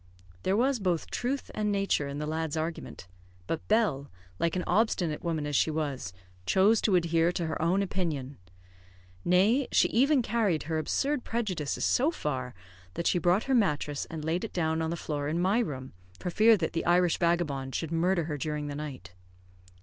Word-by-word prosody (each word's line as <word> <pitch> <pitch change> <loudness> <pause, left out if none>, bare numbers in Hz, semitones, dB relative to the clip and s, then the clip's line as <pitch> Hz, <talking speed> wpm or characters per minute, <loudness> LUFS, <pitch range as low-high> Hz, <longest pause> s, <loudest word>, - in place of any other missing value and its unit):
There 190 - +1
was 260 +1 +2
both 180 -5 -1
truth 265 +3 -2
and 210 -1 -1
nature 195 -7 0
in 140 0 -5
the 150 - -3
lad's 160 0 -2
argument; 160 - -5 0.4
but 160 - -4
Bell, 200 -11 +1 0.3
like 170 +1 0
an 180 - -1
obstinate 180 -6 +1
woman 160 -3 -1
as 145 -1 -2
she 160 - +3
was, 145 - -3 0.4
chose 205 +4 +4
to 200 - +3
adhere 170 -1 +2
to 175 - -2
her 160 0 -3
own 180 +5 +2
opinion. 155 -8 -3 0.8
Nay, 205 +10 +3
she - - +4
even 270 +2 +3
carried 215 -9 0
her 160 +1 -2
absurd 280 - -1
prejudices 190 -11 -2
so 275 +5 +3
far 130 - -4 0.4
that 170 - -3
she 175 - +3
brought 175 +5 +2
her 270 - -1
mattress 150 - +1
and 155 -2 -7
laid 165 +3 -1
it 225 - -5
down 160 -2 0
on 160 - -1
the 170 - -2
floor 145 -3 -3
in 160 +3 -1
my 190 +6 +2
room, 130 - -4 0.2
for 180 - -4
fear 220 +4 +5
that 165 -4 -2
the 165 - -2
Irish 175 -1 +3
vagabond 150 -6 0
should 165 -1 -3
murder 170 +1 +1
her 150 -2 -4
during 150 0 -3
the 145 - -5
night. 145 -10 -7
170 Hz, 190 wpm, -29 LUFS, 150-200 Hz, 0.8 s, fear